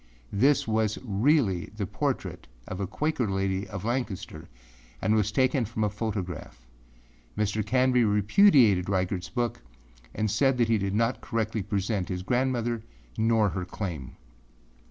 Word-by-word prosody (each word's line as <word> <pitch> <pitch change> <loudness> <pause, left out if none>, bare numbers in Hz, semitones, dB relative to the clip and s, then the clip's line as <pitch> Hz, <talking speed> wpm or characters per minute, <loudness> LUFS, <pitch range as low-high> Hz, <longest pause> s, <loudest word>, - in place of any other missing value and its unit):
This 135 +7 +3
was 110 -1 +1
really 105 - +2
the 100 - -1
portrait - - -3 0.2
of 95 - -5
a 100 - -2
Quaker 150 - -1
lady 95 0 -1
of 100 -1 -6
Lancaster 120 -5 -3 0.5
and 105 +3 +1
was 105 -1 +2
taken 130 +2 +2
from 110 0 -3
a 105 - +1
photograph. 95 - -5 0.7
Mr. 105 0 0
Canby 125 +2 +3
repudiated 105 - +5
Reigartâs 95 -1 -1
book 120 - -2 0.5
and 110 -1 0
said 135 +1 +2
he 115 -2 +3
did 100 0 -1
not 115 +3 +1
correctly 110 -2 -2
present 100 -1 -2
his 90 0 -3
grandmother 120 0 0 0.4
or 110 -2 +3
her 95 -1 -3
claim. 85 -8 -6
110 Hz, 135 wpm, -27 LUFS, 95-120 Hz, 0.7 s, repudiated